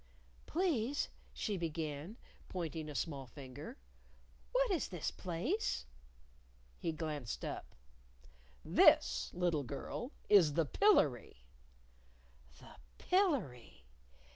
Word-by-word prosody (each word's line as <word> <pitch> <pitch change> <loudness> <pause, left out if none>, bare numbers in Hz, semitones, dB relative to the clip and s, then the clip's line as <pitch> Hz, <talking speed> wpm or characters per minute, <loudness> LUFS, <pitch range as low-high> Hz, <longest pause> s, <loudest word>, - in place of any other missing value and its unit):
"Please," 290 -6 0 0.2
she 210 -3 -2
began, 160 +3 -4 0.3
pointing 160 -3 -4
a 150 - -7
small 140 -5 -3
finger, 140 - -9 0.7
"what - - +2
is 340 -8 +1
this 180 -5 -3
place?" 185 - -2 0.9
He 165 - -1
glanced 150 -6 -4
up. - - -6 0.9
"This, - - +5
little 175 -4 +1
girl, 140 - -5 0.2
is 180 -8 +6
the 165 +1 +2
Pillery." 140 - +3 1.1
The - - -14 0.2
Pillery! 250 - 0
165 Hz, 90 wpm, -36 LUFS, 145-245 Hz, 1.1 s, is